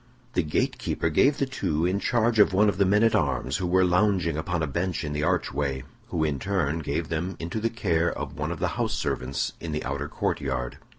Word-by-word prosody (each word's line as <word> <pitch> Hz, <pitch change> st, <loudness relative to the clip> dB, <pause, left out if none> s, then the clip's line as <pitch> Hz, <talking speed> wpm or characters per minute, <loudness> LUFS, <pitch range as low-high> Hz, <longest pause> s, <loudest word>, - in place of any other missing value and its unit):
The -, -, +2 dB
gate 75 Hz, -, -1 dB
keeper 80 Hz, -, -1 dB
gave 140 Hz, -, +4 dB
the 140 Hz, -, +1 dB
two 85 Hz, -, -1 dB
in 95 Hz, +3 st, +1 dB
charge 115 Hz, 0 st, +1 dB
of 105 Hz, -, +6 dB
one 105 Hz, +3 st, +5 dB
of 100 Hz, -, -3 dB
the 100 Hz, -, +4 dB
men 105 Hz, +3 st, +4 dB
at 115 Hz, -, +4 dB
arms 70 Hz, -2 st, +1 dB
who 90 Hz, -, -2 dB
were 95 Hz, +1 st, +4 dB
lounging 90 Hz, -3 st, +2 dB
upon 80 Hz, +1 st, -1 dB
a -, -, +2 dB
bench 85 Hz, +5 st, -2 dB
in 75 Hz, -1 st, -3 dB
the 75 Hz, -, -1 dB
archway, 70 Hz, -3 st, 0 dB, 0.2 s
who 80 Hz, -, -1 dB
in 75 Hz, -3 st, 0 dB
turn 85 Hz, -3 st, 0 dB
gave 80 Hz, +1 st, -2 dB
them 85 Hz, +4 st, -2 dB
into 85 Hz, +7 st, -3 dB
the 115 Hz, +1 st, 0 dB
care 85 Hz, -7 st, +1 dB
of -, -, -5 dB
one -, -, -3 dB
of -, -, -3 dB
the -, -, 0 dB
house -, -, 0 dB
servants 65 Hz, +3 st, -2 dB
in 80 Hz, -2 st, -5 dB
the 75 Hz, -, -2 dB
outer 70 Hz, +2 st, -3 dB
court -, -, -1 dB
yard. 65 Hz, -3 st, -3 dB
85 Hz, 235 wpm, -26 LUFS, 75-100 Hz, 0.2 s, of